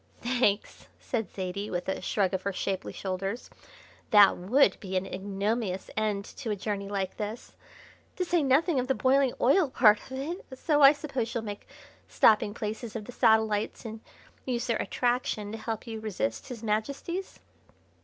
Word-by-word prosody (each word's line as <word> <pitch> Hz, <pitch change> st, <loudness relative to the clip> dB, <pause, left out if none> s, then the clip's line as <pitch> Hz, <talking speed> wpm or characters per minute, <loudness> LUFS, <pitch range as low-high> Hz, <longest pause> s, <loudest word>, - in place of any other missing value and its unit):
"Thanks!" 240 Hz, -4 st, 0 dB
said 225 Hz, -7 st, -3 dB
Zaidie, 195 Hz, +2 st, -4 dB
with 175 Hz, -1 st, -3 dB
a 190 Hz, -, -2 dB
shrug 195 Hz, -2 st, 0 dB
of 190 Hz, -, -1 dB
her 200 Hz, -, -2 dB
shapely 190 Hz, 0 st, -3 dB
shoulders. 195 Hz, +4 st, -4 dB, 0.6 s
"That 205 Hz, -3 st, +7 dB
would 205 Hz, +4 st, +3 dB
be 190 Hz, -1 st, -3 dB
an 185 Hz, -, -1 dB
ignominious 195 Hz, +1 st, -2 dB
end 210 Hz, -2 st, -1 dB
to 255 Hz, -6 st, -5 dB
a 210 Hz, -, 0 dB
journey 200 Hz, 0 st, -4 dB
like 195 Hz, -2 st, -3 dB
this, 215 Hz, +2 st, -6 dB, 0.6 s
to 365 Hz, -, -1 dB
say 345 Hz, -1 st, +2 dB
nothing 285 Hz, +2 st, +3 dB
of 250 Hz, -, -2 dB
the 265 Hz, -, +1 dB
boiling 265 Hz, 0 st, +3 dB
oil 285 Hz, +4 st, +4 dB
part 215 Hz, -5 st, +5 dB
of -, -, -9 dB
it; 330 Hz, +8 st, -4 dB
so 295 Hz, +1 st, +2 dB
I 275 Hz, 0 st, +10 dB
suppose 275 Hz, -6 st, -3 dB
you'll 230 Hz, -, -1 dB
make 205 Hz, -2 st, -7 dB, 0.4 s
stopping 210 Hz, -1 st, +4 dB
places 220 Hz, +1 st, -5 dB
of 215 Hz, -2 st, -4 dB
the 245 Hz, -, -8 dB
satellites 220 Hz, -1 st, +2 dB
and 220 Hz, 0 st, -7 dB, 0.4 s
use 245 Hz, -2 st, -2 dB
their 230 Hz, -2 st, +1 dB
attraction 240 Hz, -4 st, -1 dB
to 225 Hz, -, -6 dB
help 225 Hz, -1 st, -4 dB
you 225 Hz, -2 st, -5 dB
to -, -, -13 dB
resist 115 Hz, -, -3 dB
His 235 Hz, -3 st, -7 dB
Majesty's." 280 Hz, -, -3 dB
220 Hz, 175 wpm, -28 LUFS, 200-255 Hz, 0.6 s, I